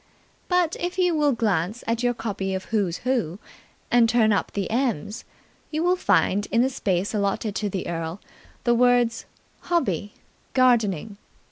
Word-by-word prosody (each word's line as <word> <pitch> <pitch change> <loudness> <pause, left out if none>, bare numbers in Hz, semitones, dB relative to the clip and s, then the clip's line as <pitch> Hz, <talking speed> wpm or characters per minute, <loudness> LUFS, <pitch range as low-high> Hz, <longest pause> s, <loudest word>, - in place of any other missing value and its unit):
But 360 -3 +2
if 355 +1 -3
you 360 -2 +3
will 300 -2 +3
glance 210 -3 -1
at 230 +1 -1
your 245 -1 +1
copy 195 -4 -3
of 190 - -5
Who's 195 -6 +1
Who, 235 -10 0 0.5
and 235 -1 +5
turn 225 -3 +4
up 200 - -1
the 200 -3 -2
"M's", 230 - -1 0.4
you 310 +1 -2
will 360 +1 +3
find 205 - +2
in 235 +1 +3
the 265 - 0
space 195 -6 -1
allotted 205 +1 -1
to 210 - -1
the 190 -1 -4
Earl 165 +1 -4 0.4
the 240 - +3
words 245 -1 +3 0.3
"Hobby 205 - -1 0.4
Gardening". 220 - +2
225 Hz, 155 wpm, -24 LUFS, 195-250 Hz, 0.5 s, and